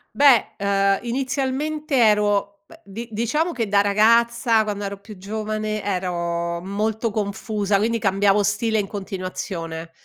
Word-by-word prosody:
Beh, 275 -6 +5
ehm, 195 0 +2
inizialmente 275 +4 -2
ero 205 -3 +2
beh, - - -17
di 220 +4 -8
diciamo 245 +10 0
che 235 -6 -2
da 200 0 +4
ragazza, 225 +2 +3
quando 205 -1 -4
ero 200 0 -5
più 205 0 -12
giovane, 215 +2 -3
ero 170 -3 -2
molto 215 +4 -2
confusa, 205 0 -1
quindi 230 +3 0
cambiavo 200 0 +2
stile 215 +2 0
in 200 - -2
continuazione. 185 -4 -5
210 Hz, 130 wpm, -22 LUFS, 195-230 Hz, -, Beh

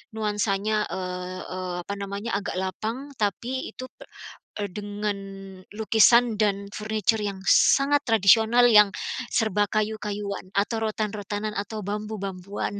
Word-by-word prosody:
nuansanya, 210 0 0
eee 180 0 -5
eee, 185 -1 -4
apa 200 - -4
namanya, 200 +2 -3
agak 200 - -5
lapang 220 +9 -4
tapi 235 +5 -2
itu 255 - -7
pe - - -12 0.6
dengan 205 +1 -3 0.6
lukisan 225 +2 +4
dan 200 -2 0
furniture 215 +1 0
yang 200 -2 -3
sangat 285 +1 +5
tradisional, 225 +2 +5
yang 210 -3 +7 0.4
serba 210 -2 +2
kayu-kayuan 210 -2 -3
atau 205 +3 0
rotan-rotanan 210 0 -3
atau 215 +2 -4
bambu-bambuan, 200 -1 -4
210 Hz, 115 wpm, -25 LUFS, 200-220 Hz, 0.6 s, yang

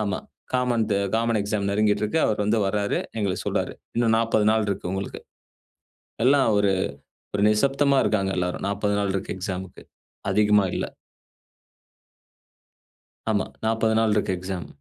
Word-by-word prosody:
ஆமா. 100 -3 -1 0.3
Common 125 -3 +1 0.3
common 115 0 +1
exam 100 0 -1
நெருங்கிகிட்டு 105 +1 +2
இருக்கு. 135 +10 0
அவர் 105 -1 0
வந்து 105 +2 +2
வர்றாரு. 100 +1 0 0.2
எங்களுக்கு 100 -3 -1
சொல்றார். - - -1 0.2
இன்னும் 115 -2 +3
40 115 -2 +2
நாள் 110 -1 +2
இருக்கு 95 -2 -2
உங்களுக்கு. 95 0 -4 1.1
எல்லாம் 135 -1 +5
ஒரு 100 -1 +3 0.6
ஒரு 100 - +1
நிசப்தமா 140 +5 +3
இருக்காங்க. 100 -3 +1
எல்லாரும் 90 0 -2
40 100 0 0
நாள் 100 -1 0
இருக்கு 95 - -3
எக்ஸாம்க்கு, 95 -1 -6 0.5
அதிகமா 105 -1 +4
இல்ல. - - -1 2.5
ஆமா, 105 -3 +1 0.2
40 110 0 +2
நாள் 110 -1 +3
இருக்கு 105 -2 +1
எக்ஸாம். 95 -1 -5
105 Hz, 135 wpm, -24 LUFS, 100-115 Hz, 2.5 s, எல்லாம்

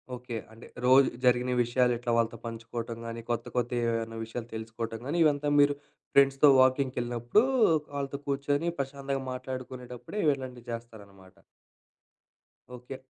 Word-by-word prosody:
Okay. 125 -1 -7 0.2
అంటే 110 +2 -13 0.2
రోజు 130 +1 +6 0.2
జరిగిన 125 0 +3
విషయాలు 125 +1 +2
ఎట్లా 120 0 -3
వాళ్ళతో 115 0 +1
పంచుకోవటం 115 0 -5
గాని, 115 0 -5
కొత్త 115 0 -1
కొత్త 120 -1 0
ఏమైనా 115 -1 -1
విషయాలు 115 +1 -6
తెలుసుకోవటం 115 0 -5
గాని, 160 +5 -1
ఇవంతా 145 -1 +2
మీరు 145 0 +5 0.4
ఫ్రెండ్స్‌తో 140 +1 +6
వాకింగ్‌కి 130 0 +2
వెళ్ళినప్పుడు, 120 - +2 0.5
వాళ్ళతో 140 0 -3
కూర్చొని 145 +4 0
ప్రశాంతంగా 135 0 -3
మాట్లాడుకునేటప్పుడే 130 - -7
ఇవి 150 - +5
ఇలాంటివి 125 -2 -9
చేస్తారన్నమాట. 100 -5 -10 1.4
ఓకే. 125 +2 -8
125 Hz, 130 wpm, -29 LUFS, 115-135 Hz, 1.4 s, రోజు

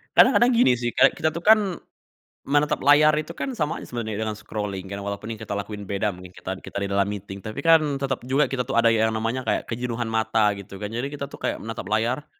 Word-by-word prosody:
kadang-kadang 240 +1 +6
gini, 230 - +4
sih, 120 0 -2
kayak 130 +4 +4
kita 155 - 0
tuh, 165 - -5
kan, 220 +2 +7 0.8
menatap 145 +1 +1
layar 150 +2 +6
itu, 155 +1 -3
kan, 270 +7 -4
sama 155 -8 -2
aja - - -9
sebenernya 110 -4 -4
dengan 110 - -2
scrolling, 105 -3 -5
kan, 100 - -4
walaupun 100 +2 -5
yang - - -12
kita 100 - -4
lakuin 100 0 -5
beda 100 +2 -1
mungkin, 90 0 -11
kita 95 0 -6
kita 100 - -7
di 100 - -2
dalam 100 0 +2
meeting 100 -1 -6
tapi, 110 +7 -6
kan, 165 0 +7 0.2
tetap 135 -2 -2
juga 135 +3 +2
kita 125 -2 -2
tuh 135 - -4
ada 115 0 +5
yang 110 0 +2
namanya 115 +3 -2
kayak - - -1
kejenuhan 120 -1 -3
mata, 110 -1 +2
gitu, 100 0 -10
kan. 105 - -3
Jadi 120 +4 -3
kita 140 -1 -5
tuh - - -10
kayak - - -3
menatap 115 -4 -6
layar, 115 +7 0
115 Hz, 230 wpm, -24 LUFS, 105-140 Hz, 0.8 s, kan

